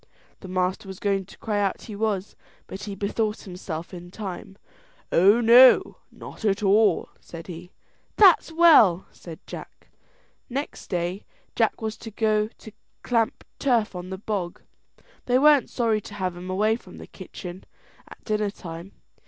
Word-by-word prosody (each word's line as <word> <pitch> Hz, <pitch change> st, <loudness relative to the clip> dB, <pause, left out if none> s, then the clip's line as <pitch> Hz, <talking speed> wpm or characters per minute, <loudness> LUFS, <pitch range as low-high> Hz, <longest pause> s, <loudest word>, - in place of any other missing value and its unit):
The 190 Hz, -, -10 dB
master 185 Hz, +1 st, -2 dB
was 190 Hz, -1 st, -8 dB
going 195 Hz, -1 st, -1 dB
to -, -, -16 dB
cry 210 Hz, -2 st, -2 dB
out 195 Hz, -2 st, -1 dB
he 215 Hz, -, -8 dB
was, 205 Hz, -2 st, -2 dB, 0.3 s
but 195 Hz, -, -8 dB
he 200 Hz, -2 st, -6 dB
bethought 210 Hz, +2 st, -2 dB
himself 180 Hz, -3 st, -7 dB
in 175 Hz, 0 st, -9 dB
time. 195 Hz, 0 st, -8 dB, 0.5 s
"Oh 200 Hz, +7 st, +5 dB
no, 240 Hz, +3 st, +7 dB
not -, -, -12 dB
at 205 Hz, -1 st, 0 dB
all," 200 Hz, -1 st, +3 dB
said 165 Hz, -1 st, -10 dB
he. 175 Hz, 0 st, -10 dB, 0.4 s
"That's 375 Hz, -5 st, +6 dB
well," 305 Hz, -, +6 dB
said 165 Hz, -3 st, -12 dB
Jack. -, -, -11 dB, 0.6 s
Next 275 Hz, +4 st, -5 dB
day 180 Hz, +1 st, -3 dB, 0.3 s
Jack -, -, 0 dB
was 220 Hz, 0 st, -3 dB
to 225 Hz, -, -9 dB
go 215 Hz, 0 st, 0 dB, 0.5 s
clamp 235 Hz, +2 st, 0 dB, 0.2 s
turf 235 Hz, -8 st, +1 dB
on 180 Hz, 0 st, -7 dB
the 190 Hz, -, -5 dB
bog. 195 Hz, -4 st, -4 dB, 0.6 s
They 250 Hz, 0 st, +3 dB
weren't 295 Hz, 0 st, +5 dB
sorry 225 Hz, -3 st, 0 dB
to 205 Hz, -, -11 dB
have 185 Hz, -3 st, -3 dB
him 180 Hz, +1 st, -8 dB
away 215 Hz, +4 st, +1 dB
from 185 Hz, -6 st, -15 dB
the -, -, -10 dB
kitchen 185 Hz, 0 st, -10 dB, 0.4 s
at -, -, -15 dB
dinner 210 Hz, -1 st, -1 dB
time. 175 Hz, -1 st, -9 dB
200 Hz, 155 wpm, -24 LUFS, 185-220 Hz, 0.6 s, no